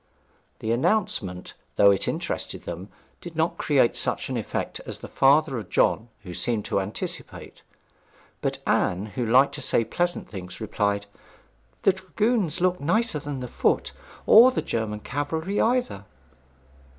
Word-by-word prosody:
The 110 - -1
announcement, 115 - 0 0.2
though 100 0 +6
it 100 - 0
interested - - -3
them, 95 +4 -7 0.3
did 170 -2 -9
not 160 +1 0
create 135 -5 +3
such - - -1
an - - -2
effect - - -3
as - - -5
the - - -9
father 135 -1 +3
of 105 - -9
John 115 - +2
had 90 -3 -8
seemed 115 -4 -1
to - - 0
anticipate; 95 +2 -6 0.8
but - - -2
Anne, 90 +3 +1
who 125 - -2
liked 125 +5 +4
to - - -5
say 115 - +2
pleasant 175 +6 -1
things, 90 -3 -8
replied, 100 -1 -1 0.8
'The 195 - +5
dragoons 190 -1 -1
looked 180 -1 +1
nicer 215 +3 +1
than 140 -2 -5
the 125 - -4
foot, - - 0 0.3
or 235 +4 +9
the 260 - -2
German 105 -2 -3
cavalry 160 - -2
either.' 235 - 0
130 Hz, 150 wpm, -25 LUFS, 105-175 Hz, 0.8 s, or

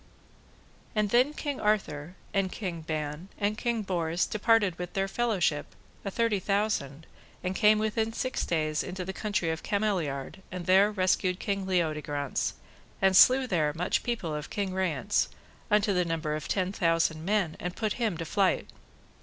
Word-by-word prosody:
And 210 -2 +1
then 250 +4 +4
King 290 -3 -3
Arthur, 180 -6 0 0.2
and 195 -2 +1
King 180 -6 -4
Ban, 155 +2 -4
and 205 +1 0
King 230 -1 -1
Bors 175 -2 0
departed 210 -4 +2
with 180 -1 -5
their 195 0 0
fellowship, 195 -10 0 0.3
a 200 - -2
twenty 225 0 +1
thousand, 190 -8 -1 0.4
and 185 +1 -2
came 215 +1 +5
within 220 +1 0
six 255 +3 -2
days 155 -2 0
into 180 0 -5
the 190 - -4
country 200 -5 -1
of 160 - -4
Cameliard, 190 -7 -1
and 180 -2 -5
there 190 +3 +5
rescued 185 -1 +1
King 195 -2 -2
Leodegrance, 150 -6 -1 0.5
and 190 -1 +3
slew 260 +6 +7
there 155 -9 +1
much 180 +2 0
people 220 -10 -2
of 150 0 -5
King 200 -3 -2
Rience, 190 +1 0 0.4
unto 210 -1 +3
the 180 -1 +2
number 160 -3 -2
of 155 - -5
ten 185 -1 0
thousand 165 -3 +1
men, 190 -4 +1
and 180 0 -4
put 215 -2 -1
him 215 -7 +1
to 165 - -4
flight. 195 +2 +1
190 Hz, 160 wpm, -29 LUFS, 165-210 Hz, 0.5 s, slew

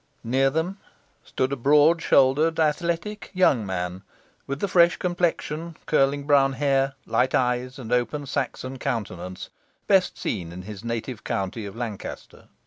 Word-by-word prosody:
Near 130 +4 +2
them 165 +7 -2 0.4
stood 130 +1 -2
a - - +1
broad 150 +6 +4
shouldered, 155 +5 +3
athletic 170 +6 -1
young 145 -11 +4
man, 90 0 -3 0.5
with 140 +1 -3
the 200 - 0
fresh 175 -2 +4
complexion, 170 -2 -2
curling 140 -1 +2
brown 140 -2 +4
hair, 135 -1 +1
light 125 +3 +1
eyes, 125 +1 0
and 125 -3 -4
open 130 +4 0
Saxon 135 -1 -3
countenance, 90 -7 -4 0.3
best - - +3
seen 85 -2 -3
in 90 +1 -8
his 105 +1 -9
native 115 0 -4
county 100 +2 -3
of 100 - -9
Lancaster. 115 -4 -7
135 Hz, 140 wpm, -25 LUFS, 115-155 Hz, 0.5 s, broad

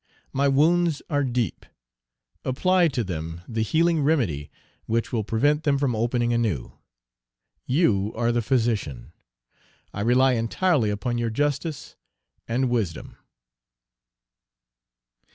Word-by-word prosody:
My 140 +1 +2
wounds 160 +3 +2
are 145 -1 +2
deep; 120 -7 -2 0.8
apply 180 +7 +2
to 130 -6 -1
them 80 -3 -5
the 115 -1 -2
healing 160 +7 +2
remedy 115 - 0 0.4
which 115 +2 -1
will 110 -2 0
prevent 145 +8 +1
them 145 -3 +2
from 135 -4 0
opening 120 +1 0
anew; 110 - -1 1.0
you 110 - +2
are 120 +1 +1
the 120 0 +1
physician; 110 - -1 0.8
I 100 - -4
rely 125 +4 +4
entirely 120 - +1
upon 110 +4 -2
your 120 -1 0
justice 145 +4 -2 0.5
and 125 +2 0
wisdom! 105 -9 -2
120 Hz, 115 wpm, -24 LUFS, 110-145 Hz, 1.0 s, rely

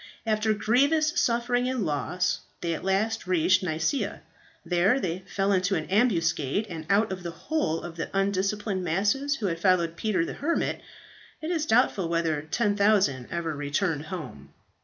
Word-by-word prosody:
After 215 0 +1
grievous 280 +9 +2
suffering 245 +1 +1
and 255 -6 -1
loss 175 +4 -1 0.2
they 170 -1 -1
at 160 - -5
last 200 +3 0
reached 185 +1 +3
Nicaea. 180 - -1 0.4
There 185 +9 +3
they 175 -6 -2
fell 195 0 0
into 185 -2 +2
an 155 - -2
ambuscade; 185 - +1
and 160 -2 -6
out 205 +1 +3
of 190 -1 -4
the 175 - -5
whole 165 - -2
of 170 -1 -8
the - - -3
undisciplined 195 0 0
masses 210 - +1
who 225 - -4
had 165 -3 -1
followed 170 -3 +2
Peter 185 -2 0
the - - -5
Hermit, 335 +4 -1 0.6
it 315 +2 -4
is 315 -3 -1
doubtful 220 -7 +2
whether 165 -3 0
10,000 200 - +2
ever 165 -2 -3
returned 145 +2 -1
home. 110 - -7
190 Hz, 160 wpm, -27 LUFS, 165-220 Hz, 0.6 s, reached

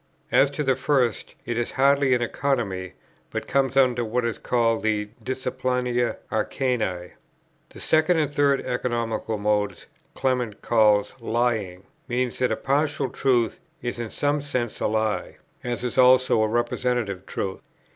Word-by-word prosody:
As 140 - +5
to 150 - 0
the 135 -2 +2
first, 130 -3 0
it 120 0 -2
is 120 - -2
hardly 140 -1 +4
an 120 - 0
Economy, 115 -9 -2 0.4
but - - -4
comes 135 -1 +1
under 125 -3 +4
what 120 +2 -1
is 115 - -2
called 115 -3 +1
the 105 -1 0
"Disciplina 125 -2 -1
Arcani." 110 -6 -1 0.6
The - - -13
second 160 +2 +3
and 150 -2 0
third 140 -1 +3
economical 115 -3 -2
modes 105 -2 -1 0.3
Clement 125 -5 -1
calls 105 -3 +3
lying; 110 -6 -1 0.2
meaning 125 -1 -1
that 125 - +1
a - - +2
partial 145 -1 0
truth 120 -4 +1 0.2
is 120 -1 -3
in 115 -2 -4
some 145 +3 0
sense 125 -5 -3
a - - +1
lie, 110 0 -1 0.3
as 120 0 -3
is 125 - -1
also 130 -2 +5
a 110 - +3
representative 120 -3 -1
truth. 95 -1 -4
120 Hz, 145 wpm, -24 LUFS, 110-130 Hz, 0.6 s, As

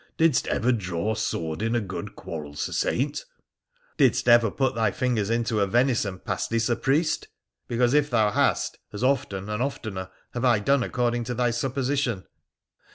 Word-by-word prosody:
Didst 160 -5 +3
ever 125 +3 +1
draw 100 -2 -1
sword 85 -6 -3
in 115 +1 0
a - - +3
good 105 0 -6
quarrel, 75 -3 -7
Sir - - -3
Saint? 140 +4 -1 0.4
' - - -39
'Didst - - +3
every 120 -3 +6
put 135 -1 0
thy 115 -3 +1
fingers 115 -2 -1
into 115 -1 0
a 100 - +2
venison 115 -3 +1
pastie, 115 +4 -2
Sir 115 +1 +1
Priest? 150 +6 0 0.4
Because, 120 +1 +2
if 150 0 +3
thou 110 -4 +3
hast, - - +1
as 105 +3 -5
often, 130 -8 0
and 105 +2 -2
oftener, 105 -8 -4 0.2
have 120 - -3
I 120 -3 +5
done 140 +6 +2
according 120 -1 -1
to 125 +1 -3
thy 120 0 +1
supposition.' 130 -3 -1
120 Hz, 170 wpm, -25 LUFS, 105-130 Hz, 0.4 s, every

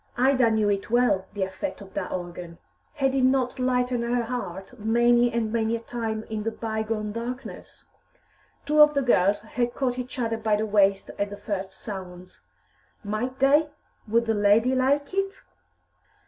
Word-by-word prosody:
Ida 255 -1 +4
knew 220 -1 +2
it 200 -1 -1
well, 235 -6 +2
the 200 - 0
effect 190 +10 -4
of 195 -2 -13
that 190 -2 -4
organ; 175 -1 -6 0.4
had 270 -3 +1
it 270 - +1
not 260 0 +2
lightened 250 -1 +1
her 240 0 0
heart 225 -2 -6
many 240 +2 +3
and 225 -2 -1
many 225 0 +1
a - - -3
time 225 -2 -4
in 220 -1 -5
the 225 - -1
by 220 -1 -3
gone 215 -1 -3
darkness? 240 +3 -7 0.8
Two 300 +1 +4
of 300 0 +7
the 280 - +2
girls 200 -5 +3
had 240 +2 -2
caught 255 -2 -1
each 250 +1 -6
other 230 -2 -1
by 215 -1 +1
the 215 +1 -1
waist 200 -2 +2
at 200 0 0
the 205 - -8
first 195 -2 -4
sounds. 185 -3 -9 0.6
Might 220 +5 -3
they? 290 +3 +4 0.4
Would 230 +2 +2
"the 225 - +1
lady" 210 +4 +3
like 280 +4 +1
it? 390 0 -2
230 Hz, 175 wpm, -25 LUFS, 205-250 Hz, 0.8 s, of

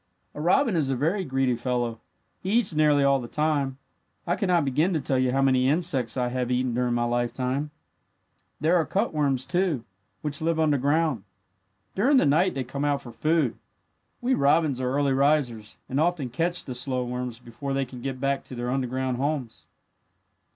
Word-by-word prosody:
"A 150 - -6
robin 190 - +3
is 150 -5 +1
a 135 - +1
very 165 +10 0
greedy 130 -4 0
fellow. 120 -1 -2 0.4
He 190 +3 -2
eats 225 -7 +2
nearly 150 -2 +4
all 140 -1 +3
the 120 - -7
time. 145 -2 0 0.5
I 175 - +1
could 200 0 -1
not 175 -4 +3
begin 150 +8 +1
to 160 - +1
tell 135 -2 0
you 130 -1 +2
how 135 +1 +2
many 130 -1 +3
insects 145 -7 +1
I 125 -1 0
have 125 0 -2
eaten 125 0 0
during 125 0 0
my 120 - +1
life. 120 0 0
"There 150 +4 -4
are 165 - +3
cutworms, 145 -8 0
too, 175 -9 0 0.4
which 145 -1 -1
live 165 0 0
underground. 150 -4 +1 0.7
During 265 +8 +3
the - - +4
night 160 +6 +3
they 135 - -1
come 140 +3 -5
out 145 -1 0
for 120 - -9
food. 155 -2 0 0.6
We 250 +2 +1
robins 140 - +2
are 125 0 -1
early 140 0 +1
risers, 135 -6 +1
and 135 - -1
often 155 -6 0
catch 170 +7 -1
the 130 - -5
slow 125 +1 -1
worms 125 -1 -4
before 120 +4 -6
they 135 0 0
can 125 -1 -10
get 135 0 -4
back 140 0 0
to 130 - -8
their 120 0 -3
underground 130 -1 -1
homes." 135 -4 -3
135 Hz, 185 wpm, -26 LUFS, 125-155 Hz, 0.7 s, nearly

